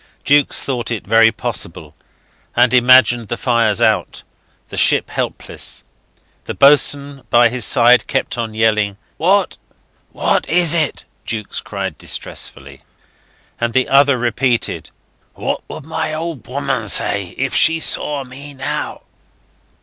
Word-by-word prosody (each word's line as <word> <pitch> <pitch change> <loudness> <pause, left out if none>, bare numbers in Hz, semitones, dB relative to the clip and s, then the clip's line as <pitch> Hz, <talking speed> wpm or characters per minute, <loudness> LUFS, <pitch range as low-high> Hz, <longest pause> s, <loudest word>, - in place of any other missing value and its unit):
Jukes 145 0 +2
thought 125 -4 -3
it 115 -3 -4
very 115 +1 +4
possible, 90 -10 -5 0.6
and 120 +1 +3
imagined 120 -2 +5
the 120 - -4
fires 115 -5 +1
out, - - 0 0.5
the - - -8
ship - - +3
helpless.... - - -4 0.6
The - - -6
boatswain 140 0 +3
by 120 0 +5
his 125 -1 -2
side 120 -2 +4
kept - - -2
on 115 -3 -5
yelling. 105 -2 +1 0.2
"What? 190 +4 +1 0.5
What - - -1
is 170 -1 +3
it?" 155 -4 -1 0.2
Jukes 110 -2 -4
cried - - -6
distressfully; - - -6 0.8
and 120 0 -2
the 130 +1 +1
other 140 -1 +4
repeated, 120 0 -1 0.5
"What - - -3
would 145 - -9
my 155 -1 -3
old 160 -7 -6
woman 130 -4 -3
say 100 -2 +1
if 135 0 -2
she 165 0 +4
saw 145 -3 0
me 140 +3 -11
now?" 135 - -5
125 Hz, 130 wpm, -17 LUFS, 115-140 Hz, 0.8 s, imagined